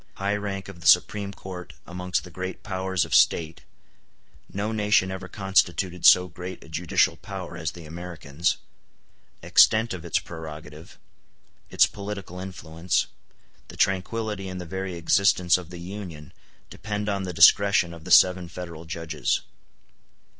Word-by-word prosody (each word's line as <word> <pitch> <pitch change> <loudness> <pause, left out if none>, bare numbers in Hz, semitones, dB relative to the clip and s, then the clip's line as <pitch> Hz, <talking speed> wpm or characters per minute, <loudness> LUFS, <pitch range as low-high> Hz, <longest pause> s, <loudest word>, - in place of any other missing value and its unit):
High 100 +1 -1
Rank 100 -2 -4
Of 95 -3 -11
The 85 - -3
Supreme 100 +3 +4
Court 95 -2 -9
Amongst 90 +1 -3
The 90 - -12
Great 95 +2 -6
Powers 95 -3 -1
Of - - -7
State 80 -1 +3 0.9
No 105 +3 -2
nation 105 -3 +2
ever 95 0 -6
constituted 95 -2 +1
so 90 0 +7
great 90 +2 -8
a - - -15
judicial 80 +1 +1
power 95 -4 -7
as 80 -2 -4
the 85 -2 -11
Americans—Extent 85 +6 -1
of 90 -3 -7
its - - 0
prerogative—Its 80 -1 -4
political 100 -3 -7
influence—The 85 -2 -5
tranquillity 100 +1 -1
and 90 0 -6
the 90 - -6
very 95 +1 -5
existence 90 0 +3
of 85 -3 -11
the 90 - -9
Union 85 -5 -8 0.4
depend 105 0 -4
on 100 -2 -1
the 95 -1 -4
discretion 90 +1 +5
of 85 -2 -12
the - - -9
seven 90 -1 +5
Federal 85 -2 -8
Judges. 80 -4 -2
90 Hz, 135 wpm, -25 LUFS, 85-95 Hz, 0.9 s, so